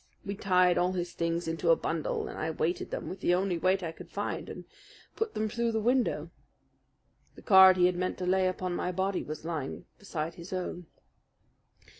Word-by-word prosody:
We 200 - -3
tied 180 -3 +3
all 180 +1 +1
his 175 -1 -3
things 170 0 -1
into 165 +1 -1
a 165 - +7
bundle, 160 -1 -2
and - - -7
I 155 - -2
weighted 160 +2 -2
them - - -5
with 185 - -6
the 175 -2 +2
only 185 -2 0
weight 185 +2 +2
I 165 - -3
could - - -12
find - - -4
and - - -8 0.5
put 450 -1 -2
them 215 - 0
through 235 +1 -1
the 220 - +1
window. 210 - +1 1.0
The - - -14
card 190 -2 +8
he 180 - +5
had 180 0 +2
meant 185 +1 -2
to 185 - -3
lay 185 +1 +3
upon 185 -1 -2
my 180 - -1
body 190 +1 -1
was 155 +1 -7
lying 155 -5 -4
beside 165 -5 -4
his 170 +2 -11
own. 180 -2 -4
180 Hz, 200 wpm, -30 LUFS, 170-190 Hz, 1.0 s, card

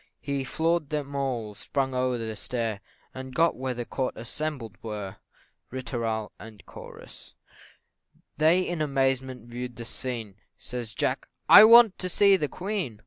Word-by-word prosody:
He 140 -1 -3
floor'd 160 +2 0
them 145 -2 -3
all, 125 -6 -2
sprung 135 +5 -2
o'er 125 -1 0
the 110 -1 -4
stair 115 -1 -3 0.3
And 130 0 -8
got 165 0 +3
where 130 -1 -3
the 120 0 -4
court 130 +1 -3
assembled 120 -1 -5
were. 105 -3 -6 0.5
Ri 130 +1 -5
tooral, 115 -3 -3
&c. 110 -1 -12 1.0
They 160 +4 +4
in 175 -3 -3
amazement 135 -3 0
view'd 120 +1 -6
the 120 - -8
scene 115 -5 -5 0.2
Says 120 -4 -6
Jack, - - -1 0.2
"I 215 - +11
want 230 -2 +7
to 185 - -3
see 200 +2 +5
the 155 -5 0
Queen!" 185 - -4
130 Hz, 145 wpm, -27 LUFS, 115-150 Hz, 1.0 s, I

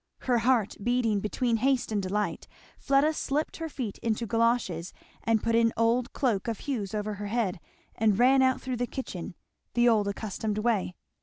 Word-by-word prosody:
Her 245 -2 +2
heart 235 -3 +2
beating 235 -2 +1
between 230 +3 0
haste 260 0 +1
and 210 -2 0
delight, 205 +2 -2 0.3
Fleda 280 +3 +3
slipped 300 0 -2
her 325 -1 -4
feet 245 -8 -5
into 230 0 -1
galoches 225 -7 0 0.3
and 225 -1 +2
put 230 - +1
an 230 0 +4
old 230 +2 +2
cloak 235 -8 0
of 225 -3 -3
Hugh's 220 -8 -3
over 210 0 -2
her 205 0 -5
head, 205 -5 -1 0.3
and 215 -2 +2
ran 260 +3 +5
out 260 -1 +3
through 255 -2 -4
the 245 +1 -1
kitchen, 190 -9 -6 0.4
the 240 0 +4
old 215 -3 +3
accustomed 210 +1 -3
way. 215 -5 0
230 Hz, 175 wpm, -28 LUFS, 210-250 Hz, 0.4 s, ran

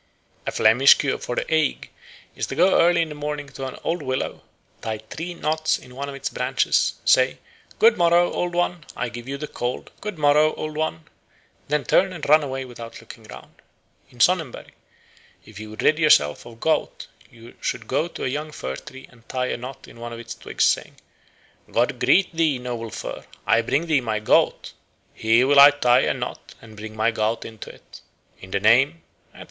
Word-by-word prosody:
A - - 0
Flemish 120 +5 +6
cure 140 -2 -1
for 120 - -4
the - - -1
ague 155 -2 0 0.5
is - - -3
to - - -5
go 180 +5 +4
early 170 0 +4
in 160 - -6
the - - -6
morning 150 0 -5
to 135 -1 -6
an 130 - -8
old 170 0 -1
willow, 130 -2 -3 0.4
tie 110 -1 -3
three 165 +11 -7
knots 155 0 0
in 125 - -15
one 140 +1 -5
of 140 - -7
its 140 - -4
branches, 125 +2 +1
say, - - +4 0.4
"Good 460 +2 +5
morrow, 175 +1 +4
Old 175 -1 -2
One, 175 -1 -1
I 125 - -3
give 120 0 -9
thee 135 - -4
the 145 +2 -5
cold; 120 -2 -5
good 210 -4 -5
morrow, 150 +1 +3
Old 155 0 -5
One," 155 - -2 0.6
then 150 0 0
turn 190 0 +2
and 165 -5 -6
run 155 +2 +6
away 135 -2 -4
without 120 -2 -10
looking - - -13
round. - - -14 0.5
In 125 - -19
Sonnenberg, 165 -2 +1 0.7
if 110 -1 -12
you 110 0 -8
would 110 - -7
rid 155 - +3
yourself 95 - +3
of 115 -1 -13
gout 160 +3 -1 0.2
you 115 0 -15
should 115 - -3
go 140 +8 0
to - - -8
a - - 0
young 150 +4 -4
fir 65 - -5
tree 130 0 -12
and 115 -2 -23
tie 125 -1 -1
a - - -1
knot 130 +2 -9
in - - -15
one 120 0 -7
of 115 - -8
its 115 0 -7
twigs, - - -3
saying, - - +1 0.8
"God 125 +2 0
greet 165 +9 +3
thee, 160 -5 +2
noble 120 -2 -5
fir. - - -7 0.2
I 115 - +4
bring 140 +7 0
thee 155 -5 +2
my 110 -3 -2
gout. 110 - +1 0.4
Here 115 +3 +3
will 140 +1 +5
I 140 +1 +11
tie 125 -4 +3
a - - +2
knot - - -7
and 110 -1 -14
bind 110 +1 -9
my 110 +2 +1
gout 110 +1 -1
into 110 -2 -9
it. - - -15 0.4
In 95 - -12
the 100 - -1
name," 135 - +3 0.3
etc. - - -18
135 Hz, 205 wpm, -23 LUFS, 115-155 Hz, 0.8 s, I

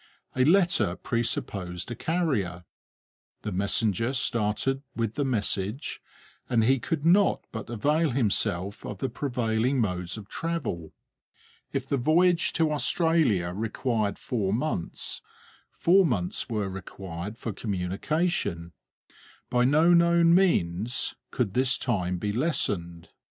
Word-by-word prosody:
A 130 - +3
letter 160 - +3
presupposed 100 -6 -3
a - - -3
carrier. 115 - -1 0.8
The 105 - -3
messenger 100 +4 +1
started 120 +3 0
with 115 -2 -1
the 145 - -1
message, 110 -2 -1 0.5
and 115 -2 +3
he 130 +3 +3
could 155 +4 -3
not 190 +4 +4
but 110 -2 -6
avail 150 +8 +1
himself 100 -6 0
of 105 - -6
the 135 - -2
prevailing 125 -1 0
modes 90 -3 -2
of 105 -2 -9
travel. 145 - -3 0.8
If - - -2
the 140 - 0
voyage 170 +6 +3
to 160 -2 +2
Australia 150 - +2
required 110 0 -1
four 105 -6 -2
months, 115 - -3 0.5
four 190 +3 +4
months 105 - -1
were 105 -4 -1
required 95 +1 -7
for 115 - -4
communication; 100 - -2 0.8
by 125 0 +3
no 155 +6 +5
known 170 0 +5
means 120 - +2 0.2
could 110 -7 -1
this 130 +1 +3
time 90 -7 -1
be 105 +4 -2
lessened. 100 - -1
115 Hz, 120 wpm, -27 LUFS, 95-150 Hz, 0.8 s, no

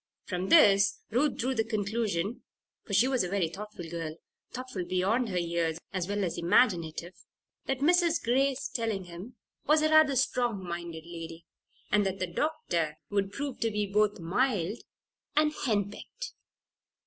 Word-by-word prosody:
From 185 0 -3
this 200 -11 +6
Ruth 265 +5 +2
drew 260 +3 0
the 225 - +1
conclusion 215 -2 -1 0.4
(for 200 - -7
she 235 +6 +5
was 260 -4 +2
a 180 -1 0
thoughtful 205 -1 -8
girl 165 -2 -5 0.4
thoughtful 255 -7 -5
beyond 200 +7 +1
her 185 - -2
years, 170 -2 0 0.2
as 185 -2 -1
well 205 0 -1
as 175 - -2
imaginative) 175 -3 +2 0.5
that 270 0 -1
Mrs. 340 +2 +4
Grace 270 +3 +1
Tellingham 200 -1 -4 0.3
was 305 +1 +5
a 310 - +3
rather 310 -3 +6
strong 240 -5 +1
minded 170 -2 -5
lady 165 -1 -8 0.5
and 210 0 +4
that 190 0 -2
the 185 - -1
doctor 175 - -1
would 200 -1 0
prove 275 +4 -4
to 230 - +1
be 210 -1 -1
both 210 +1 +2
mild 200 +2 0 0.6
and 305 0 +3
"hen 205 -3 +1
pecked." - - -8
205 Hz, 150 wpm, -29 LUFS, 175-255 Hz, 0.6 s, this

